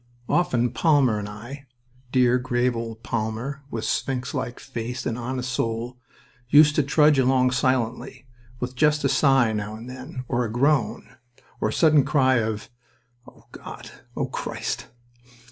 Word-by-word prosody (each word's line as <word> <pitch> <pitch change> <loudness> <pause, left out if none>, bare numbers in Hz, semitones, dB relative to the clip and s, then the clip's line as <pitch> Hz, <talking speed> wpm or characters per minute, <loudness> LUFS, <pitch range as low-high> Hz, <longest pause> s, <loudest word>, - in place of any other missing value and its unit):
Often 140 -7 +1
Palmer 140 -9 +3
and 105 0 -5
I 125 +7 -10 0.4
dear, 125 -1 +3
grave 125 0 0
old 115 -1 -6
Palmer, 115 +5 -3
with 115 -3 -4
sphinx 130 -2 -2
like 120 - -4
face 125 -1 -5
and 115 - -1
honest 125 +1 -4
soul 115 +1 -3 0.5
used 150 +2 +7
to - - +5
trudge 150 +1 +4
along 130 0 +3
silently, 130 0 -1 0.3
with 125 +1 -4
just 150 +2 +2
a 140 - +2
sigh 135 -4 +3
now 105 0 -4
and 115 +2 -10
then, 130 0 -8
or 125 -1 0
a 110 - -3
groan, 140 +3 +1 0.5
or - - 0
a - - -4
sudden 155 -4 +5
cry 130 -2 +3
of 110 -1 -3 0.6
"O - - -18
God!... - - -10 0.3
O - - 0
Christ!" - - -4
125 Hz, 150 wpm, -24 LUFS, 115-135 Hz, 0.6 s, used